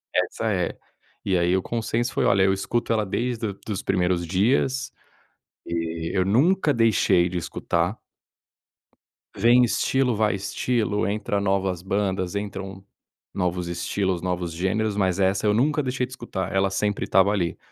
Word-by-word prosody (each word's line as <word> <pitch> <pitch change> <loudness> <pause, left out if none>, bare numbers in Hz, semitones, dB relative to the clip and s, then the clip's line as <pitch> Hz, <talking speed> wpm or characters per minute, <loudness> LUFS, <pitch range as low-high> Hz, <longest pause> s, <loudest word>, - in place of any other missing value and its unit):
essa - - 0
é - - -2 0.5
e 95 -2 +2
aí 85 +2 +2
o - - 0
consenso 120 +2 -2
foi - - 0
olha, 100 -1 +4
eu 95 0 +4
escuto 115 +4 -1
ela 110 -2 +1
desde 120 +4 -2
do 100 - -7
dos 100 -2 -3
primeiros 90 -2 +1
dias 125 +9 +1 0.8
e 85 -1 -3
eu 90 - +3
nunca 145 - +3
deixei 100 -6 +3
de 90 - -3
escutar. 85 +3 -1 1.4
Vem 120 +2 +5
estilo, 125 +1 +1
vai 105 -1 +1
estilo, 105 0 -1
entra 105 0 -1
novas 95 -3 0
bandas, 95 -1 -1
entram 100 -1 -5 0.5
novos 90 -1 -1
estilos, 90 +1 -2
novos 90 -2 -2
gêneros, 100 +4 -1
mas 95 -1 +1
essa 95 +2 +1
eu 105 - +4
nunca 145 +6 +2
deixei 125 0 -1
de 125 - -16
escutar. 120 -8 -5
Ela 95 0 +2
sempre 105 +1 -1
estava 95 +2 +4
ali. 90 -5 -1
100 Hz, 150 wpm, -24 LUFS, 90-115 Hz, 1.4 s, Vem